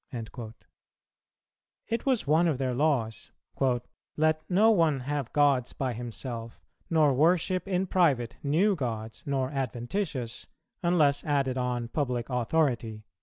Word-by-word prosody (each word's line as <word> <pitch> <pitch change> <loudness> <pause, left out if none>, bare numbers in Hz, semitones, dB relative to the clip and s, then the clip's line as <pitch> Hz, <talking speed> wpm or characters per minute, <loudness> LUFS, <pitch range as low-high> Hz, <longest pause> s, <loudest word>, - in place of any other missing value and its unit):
"[234:1] 115 -2 -7 1.4
It 230 +3 -2
was 255 -4 +2
one 160 +4 +3
of 155 -5 +1
their 130 -1 -1
laws, 125 -5 0 0.9
"Let 155 0 +2
no 210 +5 +5
one 160 -9 +2
have 140 -1 -3
gods 140 -4 +2
by 130 -2 -2
himself, 115 0 -6 0.3
nor 155 -4 +4
worship 175 +6 +2
in 190 -1 0
private 145 -11 +2
new 175 +9 +2
gods 115 -6 -4
nor 135 -2 0
adventitious, 130 - -3 0.3
unless 155 -5 +3
added 135 -4 0
on 125 -1 -1
public 125 -4 -2
authority." 120 -4 0
140 Hz, 125 wpm, -28 LUFS, 120-160 Hz, 1.4 s, no